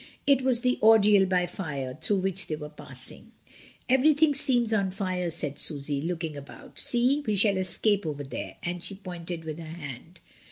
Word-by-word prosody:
It 275 -2 +4
was 255 -2 +2
the 250 0 +1
ordeal 210 -3 +6
by 180 -1 +1
fire 140 -8 -5
through 195 +3 0
which 190 -1 +1
they 155 - -2
were 150 -1 -8
passing. 150 - -7 0.5
"Everything 295 +4 +4
seems 245 -5 +2
on 200 -3 +1
fire," 185 -2 -3
said 150 -3 -3
Susy, 145 -2 +1
looking 165 -1 -3
about. 255 - -10
"See, 255 +4 +2
we 215 - +1
shall 200 0 +4
escape 190 0 +1
over 145 -2 -4
there," 135 -4 -7
and 175 0 -4
she 200 - -5
pointed 175 -3 -6
with 155 0 -6
her - - -7
hand. 160 +1 -9
185 Hz, 175 wpm, -27 LUFS, 160-225 Hz, 0.5 s, ordeal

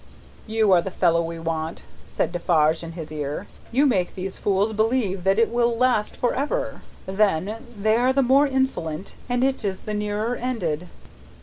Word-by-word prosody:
"You 220 -2 +2
are 180 -2 +6
the 190 - -4
fellow 170 -2 +2
we 165 0 -4
want," 165 0 -3 0.2
said - - -1
Defarge, 160 -2 +2
in 165 -1 -7
his 160 -3 -7
ear; 150 +4 -4 0.3
"you 270 +5 +3
make 190 -10 +1
these 190 0 -5
fools 205 +2 +1
believe 215 -4 0
that 195 +1 +3
it 230 0 +3
will 235 -1 +1
last 245 -4 +1
for 245 - +1
ever. - - -2 0.2
Then, 205 +4 0
they 215 +2 +3
are 250 +2 +3
the 275 +1 +3
more 275 +4 +5
insolent, 230 - -2 0.2
and 245 +1 +1
it 265 -2 +1
is 195 -2 -2
the 215 - -4
nearer 210 +3 -1
ended." 180 -11 -2
205 Hz, 180 wpm, -24 LUFS, 170-245 Hz, 0.3 s, are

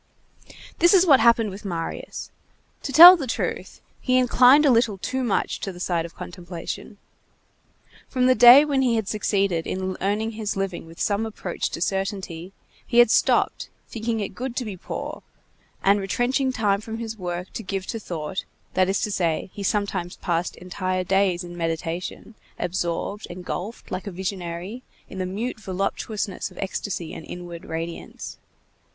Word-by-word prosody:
This 345 +3 +6
is 370 -1 +6
what 285 -6 +7
had 225 - +2
happened 230 -3 +4
with 195 +2 -9
Marius. 170 -4 -5 0.5
To 275 - -4
tell 345 +6 +12
the 290 -7 -4
truth, 230 - -3 0.2
he 255 -1 +2
inclined 255 +3 +6
a 280 - +6
little 230 -4 +2
too 260 +7 -2
much 230 -5 0
to 195 - -4
the 175 - -11
side 175 -2 -1
of 165 - -20
contemplation. 175 +3 -7 1.1
From 255 -1 +1
the 255 - +6
day 245 +4 +9
when 280 -3 +1
he 245 -3 +2
had 220 -3 -1
succeeded 195 -5 0
in 185 0 -3
earning 210 +4 0
his 215 -2 -3
living 195 -4 -3
with 165 +1 -14
some 205 +1 +1
approach 210 -5 -3
to - - -6
certainty, 190 -2 -3 0.4
he 235 - -1
had 240 -2 +7
stopped, - - +2 0.2
thinking 225 -1 -2
it 200 - -2
good 255 -1 -5
to 250 - -2
be 205 -3 -5
poor, 180 - -6 0.6
and 200 +1 +4
retrenching 245 +7 0
time 210 -5 +1
from 220 +1 -6
his 225 -1 -5
work 180 0 -5
to - - -4
give 195 -2 -4
to 225 - -4
thought; 170 -2 -4 0.3
that 185 0 +2
is 195 - 0
to 210 - -1
say, 170 -1 -1
he 205 - -7
sometimes 200 -3 -1
passed 170 0 -1
entire 185 0 -3
days 190 -1 +1
in 175 0 -9
meditation, 165 +5 -4 0.2
absorbed, 180 +3 -3
engulfed, 180 +4 -6
like 185 +3 -4
a - - -3
visionary, 185 +3 -5 0.3
in 190 - -7
the 185 - -1
mute 220 +5 -4
voluptuousness 195 +1 -3
of - - -18
ecstasy 190 -3 -4
and - - -8
inward 175 -1 -8
radiance. 165 +1 -6
195 Hz, 170 wpm, -24 LUFS, 180-230 Hz, 1.1 s, tell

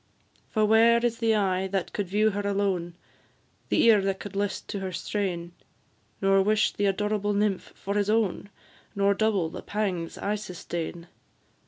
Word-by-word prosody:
For 215 -1 +2
where 225 +2 +5
is 230 -1 -1
the 225 -1 +2
eye 190 -2 +1
that 190 -1 -3
could 205 -3 -2
view 210 +4 +2
her 205 +1 -2
alone, 195 -4 -1 0.7
The - - +3
ear 225 -3 +6
that 195 0 -1
could 205 -1 -8
list 205 0 -2
to 200 - -3
her 190 -1 -4
strain, 180 -2 -3 0.7
Nor 195 0 +5
wish 215 +2 +2
the 205 - 0
adorable 205 +1 0
nymph 205 -2 0
for 200 - -4
his 205 0 0
own, 210 -2 0 0.5
Nor 200 0 +3
double 200 -5 +1
the - - -7
pangs 190 -6 -3
I 205 - -1
sustain? 175 -3 -6
200 Hz, 165 wpm, -27 LUFS, 190-210 Hz, 0.7 s, ear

